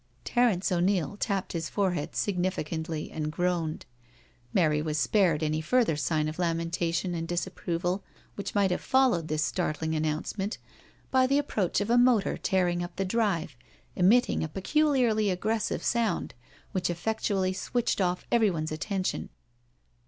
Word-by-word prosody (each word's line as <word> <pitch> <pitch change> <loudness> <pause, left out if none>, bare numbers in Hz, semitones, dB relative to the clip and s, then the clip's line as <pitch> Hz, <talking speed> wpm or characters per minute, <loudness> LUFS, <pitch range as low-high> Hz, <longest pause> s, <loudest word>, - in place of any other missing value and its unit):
•• - - -35
Terence 230 -7 +2
O'Neil 180 0 +1
tapped 200 -2 -2
his 165 -1 -3
forehead 180 -7 -1
significantly 170 -4 -2
and 155 -1 -3
groaned. 175 -2 -1 0.7
Mary 155 -5 +2
was 155 0 -2
spared 170 -3 +2
any 155 0 0
further 220 0 +2
sign 155 +1 0
of 155 +3 -5
lamen 165 -1 0
tation 170 +1 -1
and 165 0 -3
disapproval 175 +2 -2 0.3
which 200 +1 -6
might 200 -2 +3
have 180 - -1
followed 255 -12 +2
this 155 0 0
startling 155 +2 -1
announcement 155 +7 -2 0.5
by 260 -1 +4
the 275 +2 +3
approach 215 -11 0
of 205 +3 -1
a 240 - +5
motor 240 -5 +3
tearing 180 -3 +1
up 175 - -6
the 195 - -1
drive, 190 - 0 0.4
emitting 205 +5 +3
a - - -1
peculiarly 230 - +2
aggressive 215 +4 -1
sound, 235 -2 0 0.4
which 185 -1 -1
effectually 190 +1 0
switched 225 +3 -1
off 180 -1 0
everyone's 185 -10 +2
attention. 185 +4 -2
180 Hz, 145 wpm, -28 LUFS, 165-210 Hz, 0.7 s, a